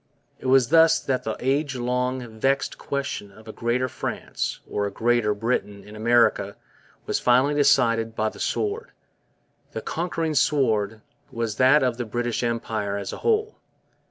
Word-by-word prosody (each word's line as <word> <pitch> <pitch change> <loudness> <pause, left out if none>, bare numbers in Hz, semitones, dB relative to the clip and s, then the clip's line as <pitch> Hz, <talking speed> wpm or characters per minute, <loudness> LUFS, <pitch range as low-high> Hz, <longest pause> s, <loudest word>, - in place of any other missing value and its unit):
It - - -6
was 130 -2 +4
thus 165 +1 +6
that 130 -2 -2
the 110 - -2
age 140 +2 0
long 125 0 -1
vexed 135 +3 0
question 140 -7 -4
of 110 +3 -17
a - - -6
Greater 120 +3 -1
France - - -4
or 100 0 -1
a - - -5
Greater 115 -2 +1
Britain 105 -2 -2
in 105 - -12
America 115 -3 +2 0.5
was - - -1
finally 130 +4 +3
decided 115 -6 +3
by 110 0 0
the - - -14
sword. 430 +3 -2 0.8
The - - -4
conquering 165 -1 -2
sword 110 -8 +1 0.3
was 115 -3 -3
that 130 +3 +5
of 125 -2 0
the 120 - -3
British 120 +1 -2
Empire 110 -4 -2
as 100 - -5
a - - -6
whole. 440 -1 0
120 Hz, 155 wpm, -24 LUFS, 110-135 Hz, 0.8 s, thus